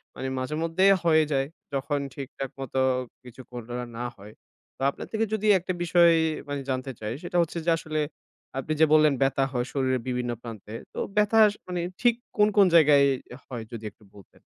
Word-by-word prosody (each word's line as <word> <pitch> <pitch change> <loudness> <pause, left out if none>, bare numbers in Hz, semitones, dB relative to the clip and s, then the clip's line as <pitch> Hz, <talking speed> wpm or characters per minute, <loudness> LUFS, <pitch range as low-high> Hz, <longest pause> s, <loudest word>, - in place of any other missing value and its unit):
মানে 130 - -4
মাঝেমধ্যেই 165 +8 +2
হয়ে 160 -2 +5
যায় 135 -1 +1 0.3
যখন 140 +1 -1
ঠিকঠাক 135 -1 -6
মতো 135 0 -3 0.4
কিছু 125 +1 -12
করা 120 0 -5
না 125 - -2
হয়। 105 +2 -13 0.4
তো - - -15
আপনার - - -7
থেকে 225 0 +1
যদি 215 0 0
একটা 185 +1 -3
বিষয় 170 0 +5 0.4
মানে 145 -1 -3
জানতে 130 0 -2
চাই 110 +1 -4
সেটা 175 0 -2
হচ্ছে 170 0 -2
যে - - +2
আসলে 155 -1 -3 0.6
আপনি 155 +4 -2
যে - - +9
বললেন 155 -1 +6
ব্যথা 135 0 +2
হয় 125 -1 -1
শরীরের 130 -3 0
বিভিন্ন 125 -1 -1
প্রান্তে, 110 -2 -9 0.2
তো - - -5 0.2
ব্যথা 210 +2 +4
স - - -9
মানে 180 -1 -2 0.2
ঠিক 240 -1 +4 0.2
কোন, 210 - +5
কোন 200 - +8
জায়গায় 145 -3 +6 0.4
হয় 120 -4 -6
যদি 115 -2 -7
একটু 105 - -26
বলতেন? 100 - -18
140 Hz, 180 wpm, -26 LUFS, 125-170 Hz, 0.6 s, যে